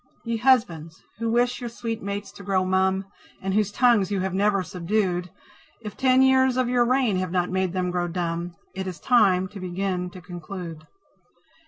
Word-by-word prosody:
Ye 230 -1 -2
Husbands, 175 -11 +1 0.2
who 230 0 -1
wish 245 +2 +1
your 240 - -4
sweet 230 -1 -5
mates 200 0 -5
to - - -13
grow 190 -1 +1
mum, 190 +1 +1 0.3
And 195 0 -2
whose 210 -1 +1
tongues 230 -4 +3
you 200 -2 -1
have 190 -1 -2
never 200 0 +2
subdued, 180 0 -1 0.5
If 210 -3 -8
ten 260 0 +4
years 260 -1 +4
of 255 -1 +2
your 245 -1 +3
reign 250 -5 +2
have 185 0 -1
not 180 0 0
made 190 -1 0
them 180 -1 -1
grow 175 -1 -1
dumb, 170 0 -3 0.2
It 190 0 -4
is 180 -2 -6
time 190 -7 +3
to 205 - -9
begin 180 0 -2
to 185 - -11
conclude. 175 -2 -8
190 Hz, 185 wpm, -25 LUFS, 180-230 Hz, 0.5 s, ten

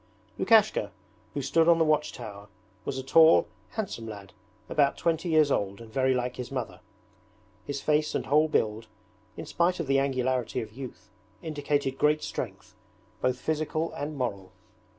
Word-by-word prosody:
Lukashka, 215 - +4 0.5
who 140 - -2
stood 165 +5 +3
on 170 -1 +6
the 165 - +3
watch 155 -1 +2
tower, 100 -1 -9 0.4
was 135 - -3
a 130 - -4
tall 160 +4 +6 0.3
handsome 195 - -4
lad 100 -3 -9 0.3
about 145 -2 +2
twenty 165 +1 0
years 155 -3 +4
old 100 -3 -1
and 115 -1 -12
very 130 -1 +2
like 125 0 -2
his 125 0 -6
mother. 130 -4 -4 0.9
His 140 -1 -3
face 150 0 +1
and - - -1
whole 150 +3 +4
build, 110 -6 0 0.5
in - - -6
spite 175 +1 +1
of 165 - -1
the 135 0 +3
angularity 130 -2 0
of 110 -3 -7
youth, 130 -6 -9 0.3
indicated 145 -3 -1
great 150 +1 +3
strength, - - -6 0.5
both 125 0 +1
physical 155 +2 -2
and 145 +1 -5
moral. 100 -7 -3
140 Hz, 160 wpm, -28 LUFS, 125-155 Hz, 0.9 s, on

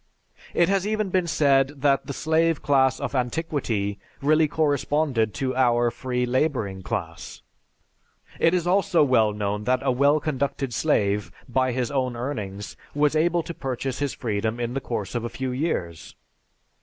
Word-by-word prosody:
It 170 - +4
has 195 +1 +1
even 215 -2 -1
been 185 -2 +1
said 140 -2 +2
that 140 -1 +2
the - - -3
slave 160 +1 +1
class 130 -2 +3
of - - -4
antiquity 125 -7 -1 0.2
really 155 +2 +3
corresponded 145 -5 +1
to 130 -1 -2
our 120 -2 +3
free 125 0 -2
laboring 125 -7 -1
class. - - -5 1.0
It 165 +2 +4
is 175 -2 0
also 175 -3 +3
well 115 -6 +3
known 105 0 -3
that 125 0 +1
a - - +3
well 140 +4 +3
conducted 140 -3 -2
slave, 100 -4 +1 0.2
by 130 +1 +1
his 125 -1 -2
own 130 -3 -1
earnings, 105 -6 -5 0.2
was 150 +1 +2
able 170 +2 +2
to 170 - -6
purchase 130 -2 -4
his 145 -2 -2
freedom 110 -1 -2
in 120 0 -2
the 135 - -2
course 115 -6 -4
of 120 -2 -2
a 120 - -3
few 130 +1 -4
years. 125 - -3
130 Hz, 160 wpm, -24 LUFS, 120-155 Hz, 1.0 s, It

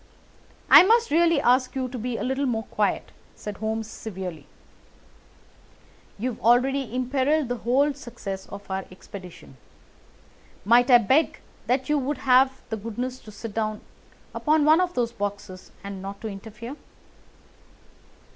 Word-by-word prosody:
"I - - +10
must 460 +2 +3
really 335 0 +4
ask 255 0 +2
you 260 -1 -1
to 255 - -6
be 240 +1 -3
a - - -3
little 265 +2 -1
more 225 -3 -1
quiet!" - - -1 0.2
said 210 -1 -7
Holmes 220 +1 -2
severely. 185 -8 -7 1.7
"You 250 +5 -2
have - - -11
already 250 +1 +2
imperilled 265 +3 +1
the 245 - -1
whole 265 +6 +2
success 200 -8 -7
of 200 -1 -10
our 190 0 -2
expedition. 185 -6 -12 1.1
Might 240 +4 +5
I 245 - +9
beg 260 +8 +2 0.3
that 260 +1 +1
you 300 0 +2
would 280 +1 -2
have 260 +1 +3
the 220 - -3
goodness 245 +4 -5
to 215 - -13
sit 210 +1 -8
down 215 -1 -2 0.5
upon 305 -1 +2
one 315 +3 +6
of 360 -1 -1
those 235 -1 0
boxes, 200 -3 -6
and 200 -1 -7
not 195 +1 -7
to 225 - -4
interfere?" 220 +6 -8
240 Hz, 145 wpm, -25 LUFS, 210-270 Hz, 1.7 s, I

